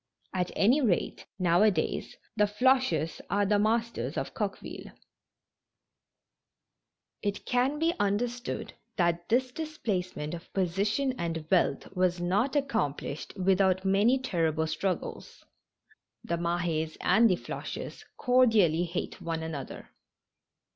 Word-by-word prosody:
At 180 -1 0
any 245 +9 +4
rate, 210 -10 0
now 175 -1 +3
a 215 - +7
days 160 -6 -2 0.2
the 210 -1 +4
Floches 210 - +2
are 200 +2 +2
the 205 +1 +3
masters 230 +2 0
of - - -3
Coqueville. - - -5 2.3
It 205 -1 -3
can 255 +4 +1
be 325 +2 +2
understood 235 +5 -1 0.2
that 170 -1 0
this 250 +2 +2
displacement 200 - -3
of 175 +1 -8
posi 190 +1 +1
tion 275 +2 +1
and 165 -2 -3
wealth 185 +1 +1
was 180 -1 +1
not 200 +11 +1
accomplished 160 - -2
without 190 0 +2
many 205 +7 +4
ter 175 -11 0
rible 160 +1 -1
struggles. 175 +4 -4 0.8
The 170 - -1
Mah^s 170 -2 -1
and 230 +1 +5
the 185 - +3
Floches - - -6
cordially 220 - +4
hate 175 +1 -4
one 165 -1 -3
another. 150 -5 -6
195 Hz, 120 wpm, -29 LUFS, 170-235 Hz, 2.3 s, a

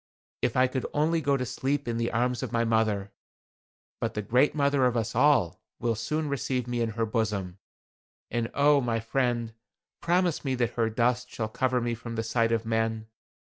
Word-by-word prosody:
If - - 0
I 130 - +6
could 130 0 -2
only 160 +2 +2
go 140 -2 +2
to 125 - -2
sleep 135 +3 -2
in 115 -1 -1
the 115 0 0
arms 125 +1 0
of 130 - -4
my 115 0 +1
mother. 110 -3 +1 0.9
But - - -2
the 105 - -2
Great 125 +9 +3
Mother 140 -3 +3
of 120 -1 0
us 115 0 -1
all 120 - +3 0.2
will 115 0 0
soon 150 +8 -2
receive 130 -3 -2
me 120 -1 -1
in 115 - +1
her 115 - +1
bosom. 105 -5 -2 0.7
And 120 -1 -1
oh! 145 0 +5
my 115 -2 0
friend, 120 -1 -1 0.5
promise 175 -1 +1
me 135 -2 0
that 120 -2 0
her 115 -2 +1
dust 120 +2 0
shall 110 -2 -4
cover 130 +2 0
me 120 0 -1
from 115 0 -6
the 115 - -1
sight 115 0 +1
of 115 -1 0
men. 110 0 -1
120 Hz, 195 wpm, -27 LUFS, 115-130 Hz, 0.9 s, I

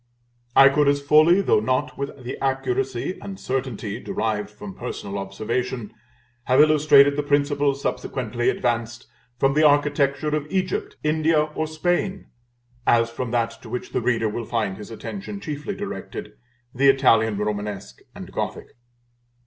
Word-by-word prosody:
I 135 0 +9
could 145 +1 +2
as 140 0 +3
fully, 155 +6 +5
though 190 - +3
not 130 +4 -1
with 140 -1 -6
the 125 - -5
accuracy 135 +3 -1
and 195 -1 -8
certainty 125 -5 -3
derived 105 -4 -2
from 105 -2 -10
personal 100 +1 -5
observation, 110 +4 -3 0.5
have 130 0 +3
illustrated 150 -2 +6
the 145 - 0
principles 145 -1 +1
subsequently 120 -1 -1
advanced, 120 -1 -2 0.3
from 135 +2 +2
the 155 - +3
architecture 145 0 +3
of 150 -1 -3
Egypt, 185 0 -2
India, 155 0 +2
or 155 +1 -3
Spain, 175 +5 -1 0.6
as 115 0 +3
from 120 +1 -4
that 115 -1 -1
to 115 - -11
which 125 +2 -5
the - - -1
reader 115 -2 +1
will 110 +2 -4
find 110 -5 -2
his 105 - -9
attention 200 - -7
chiefly 155 +2 -5
directed, 200 - -6 0.4
the 135 +2 +4
Italian 115 -6 +4
Romanesque 105 -7 -4 0.2
and - - -9
Gothic. - - -4
135 Hz, 145 wpm, -23 LUFS, 115-150 Hz, 0.6 s, I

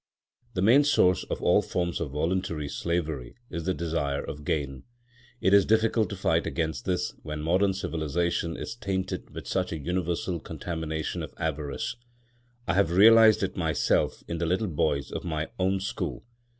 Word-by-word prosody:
The 90 - 0
main 125 +8 +6
source 90 - +3
of - - -4
all - - +5
forms 85 -1 -2
of 85 - -3
voluntary 80 +1 -1
slavery 80 -5 -3 0.2
is 85 -1 -4
the 95 - +1
desire 80 -4 -1
of 75 - -7
gain. 70 -3 -2 0.6
It 95 - +3
is 100 -1 +7
difficult 110 0 +2
to - - -4
fight - - +1
against 80 -6 -2
this 90 -1 -1
when 75 -1 -5
modern 95 +4 +2
civilisation 85 -1 -1
is - - -5
tainted 95 -4 -3
with - - -8
such 90 -1 -1
a 80 - -2
universal 85 +2 -2
contamination 80 -2 -4
of - - -7
avarice. 75 - -3 0.7
I 85 - +2
have 95 -3 +3
realised 110 +4 +7
it 95 - -2
myself 80 -4 +1
in 85 -1 -3
the 85 - 0
little 95 +6 +1
boys 75 -2 0
of - - -4
my 80 -2 -3
own 95 +1 +2
school. 95 - -4
85 Hz, 165 wpm, -27 LUFS, 80-95 Hz, 0.7 s, is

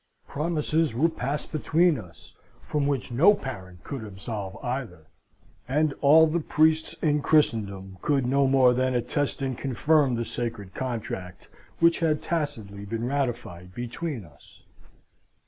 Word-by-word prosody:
Promises 155 -2 0
were 160 +7 +3
passed 145 -2 -4
between 160 0 +2
us, 90 -5 -14 0.3
from 145 -2 -1
which 140 -4 -2
no 170 - +6
parent 95 - -8
could 135 -5 -6
absolve 100 0 -6
either; 120 - -4 0.6
and 150 +3 +1
all 155 +3 +7
the 160 +2 0
priests 160 0 +2
in 150 -2 +2
Christendom 100 -11 +1
could 140 -3 +1
no 135 +2 +3
more 130 -2 +5
than 130 0 0
attest 135 +4 -1
and 130 -1 -1
confirm 140 +1 +2
the 115 0 -2
sacred 115 -7 -5
contract 110 -8 -5 0.3
which 170 0 +4
had 155 -3 +1
tacitly 110 -12 -3
been 115 +3 -3
ratified 120 -10 -3
between 120 - -4
us. 75 -3 -20
130 Hz, 135 wpm, -26 LUFS, 110-150 Hz, 0.6 s, all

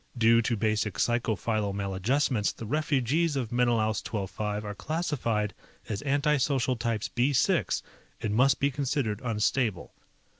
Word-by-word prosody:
Due 115 0 +5
to 115 0 -1
basic 105 -3 0
psycho 120 +2 +1
philo 105 -1 -1
maladjustments 100 +5 0
the 115 - -9
refugees 150 +3 +1
of 125 -5 -2
Menelaus 115 -3 +1
XII 105 -3 -3
5 105 +2 -4
are 105 - -4
classified 115 - -1 0.4
as 105 -1 -3
anti 145 +1 +2
social 130 -2 +1
types 115 -2 -2
B 130 +4 +1
6 125 - +2 0.4
and 105 - -2
must 130 +5 +4
be 140 +1 +2
considered 135 -5 -1
unstable. 110 -3 0
115 Hz, 145 wpm, -28 LUFS, 105-135 Hz, 0.4 s, Due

